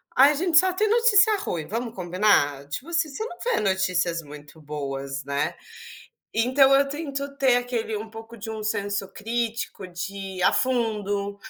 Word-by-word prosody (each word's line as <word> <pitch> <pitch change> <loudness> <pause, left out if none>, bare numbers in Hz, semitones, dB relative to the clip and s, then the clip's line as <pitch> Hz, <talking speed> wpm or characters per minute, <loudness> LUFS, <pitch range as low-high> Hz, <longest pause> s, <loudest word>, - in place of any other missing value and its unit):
a 275 +3 +7
gente 320 +2 +2
só 375 0 +2
tem 430 +3 +1
notícia 440 -2 +5
ruim, 160 - -4
vamos 230 +1 -4
combinar? 175 -7 +2
Tipo 255 - -5
assim, 330 -2 0
você 285 +11 -5
não 350 -6 -8
vê 485 0 +1
notícias 180 -4 0
muito 150 +1 -13
boas, 140 -2 -5
né? 140 0 -1 0.8
Então 260 +4 +4
eu 275 0 +4
tento 280 -1 -5
ter 260 -2 +4
aquele 240 -3 -2
um 220 +2 -6
pouco 225 +1 -11
de 220 0 -8
um 220 -1 -5
senso 205 -2 -2
crítico 230 -2 -3
de 175 +2 -6 0.2
ir 185 - -3
a - - +5
fundo, 210 -5 -1
220 Hz, 165 wpm, -25 LUFS, 180-275 Hz, 0.8 s, a